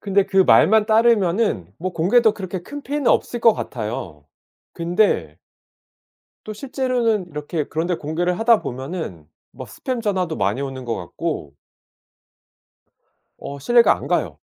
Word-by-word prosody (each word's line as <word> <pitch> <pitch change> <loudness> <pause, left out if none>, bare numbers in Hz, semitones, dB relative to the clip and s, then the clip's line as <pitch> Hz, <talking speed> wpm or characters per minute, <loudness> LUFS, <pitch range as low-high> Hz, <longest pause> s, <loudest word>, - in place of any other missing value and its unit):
근데 200 -1 +2
그 195 - 0
말만 210 +3 +5
따르면은 215 - +2
뭐 185 +2 -4
공개도 210 +7 +3
그렇게 185 -3 -6
큰 290 +6 -8
피해는 285 -2 -1
없을 240 - 0
것 230 0 +6
같아요. 110 - -6 0.5
근데 170 - 0 1.1
또 215 - -5
실제로는 240 -5 -1
이렇게 150 +1 -3
그런 160 +4 -3
데 180 - 0
공개를 175 +4 -2
하다 225 -1 +4
보면은 130 - -6 0.3
막 - - -9
스팸 255 -3 -4
전화도 185 -6 -1
많이 100 +7 0
오는 135 -2 -5
것 120 -1 -2
같고 90 - -5 1.8
어 140 - -7
신뢰가 235 - +4
안 - - -9
가요. - - -1
180 Hz, 275 characters per minute, -21 LUFS, 140-225 Hz, 1.8 s, 것